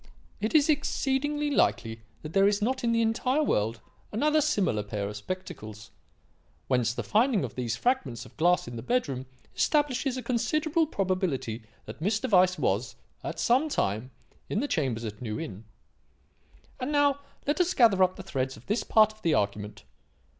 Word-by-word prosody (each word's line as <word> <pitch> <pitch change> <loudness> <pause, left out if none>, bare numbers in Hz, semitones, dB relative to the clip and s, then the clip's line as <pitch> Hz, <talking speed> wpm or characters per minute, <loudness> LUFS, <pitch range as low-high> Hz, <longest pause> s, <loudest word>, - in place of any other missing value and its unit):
It 215 +8 -2
is 295 -2 +6
exceedingly 290 0 0
likely 115 - +1 0.2
that 155 +1 -7
there 195 0 +5
is 205 0 +2
not 255 +5 -1
in 235 - +2
the 230 0 +2
entire 250 +6 +1
world 110 - 0 0.3
another 300 +8 +2
similar 185 - +1
pair 105 -1 -4
of 105 - -6
spectacles. 110 - -7 0.8
Whence 125 -3 +2
the - - -4
finding 225 -1 +2
of - - -4
these 120 -3 -2
fragments 145 - -1
of - - -16
glass 175 -1 +2
in 120 0 -6
the - - -5
bedroom 135 - -1 0.3
establishes 280 -3 +1
a 255 - -5
considerable 310 +6 +1
probability 185 - -1 0.2
that 115 +8 -10
Mr. 205 +4 0
Weiss 185 -2 +4
was, - - 0 0.3
at - - -4
some 265 +6 +2
time, 110 - -1 0.4
in 205 - 0
the 285 - -1
chambers 130 - -1
at 105 +1 -7
New 110 0 -4
Inn. 115 - -7 1.1
"And 255 +3 -2
now 285 -1 +3 0.3
let 295 +5 +1
us 360 +1 +1
gather 220 -6 +5
up 185 0 +4
the 190 - -8
threads 130 -8 -3
of 110 - -16
this 210 +4 0
part 215 -1 +4
of 215 - -24
the 165 -5 +2
argument. 105 +1 -2
190 Hz, 175 wpm, -28 LUFS, -, 1.1 s, is